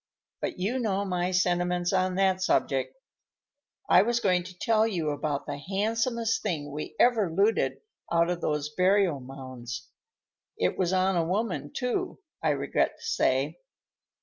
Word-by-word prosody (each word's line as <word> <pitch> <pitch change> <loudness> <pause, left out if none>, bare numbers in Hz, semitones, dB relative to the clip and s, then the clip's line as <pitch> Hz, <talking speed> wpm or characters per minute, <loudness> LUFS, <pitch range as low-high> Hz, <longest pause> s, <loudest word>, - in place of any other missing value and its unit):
But - - -3
you 210 +8 -1
know 200 -4 0
my 180 -1 -1
sentiments 180 0 +1
on 185 -1 +1
that 190 -1 +2
subject. 135 - +1 0.9
I - - +7
was 235 +3 +1
going 185 -5 +2
to 180 0 -11
tell 220 +2 +2
you 170 -8 -1
about 145 -1 -2
the 145 -1 -5
handsomest 225 - 0
thing 150 -8 -3
we 150 +2 -6
ever 225 -8 +4
looted 200 +6 +1 0.3
out 170 +1 +3
of 175 -1 -3
those 150 -1 -1
burial 185 -4 +3
mounds. 130 -2 -8 0.7
It - - +1
was 180 -2 0
on 190 0 +2
a 170 - +2
woman, 195 +4 -2
too, 270 +8 -2 0.2
I - - +1
regret - - 0
to - - -12
say. - - +1
185 Hz, 150 wpm, -28 LUFS, 165-210 Hz, 0.9 s, I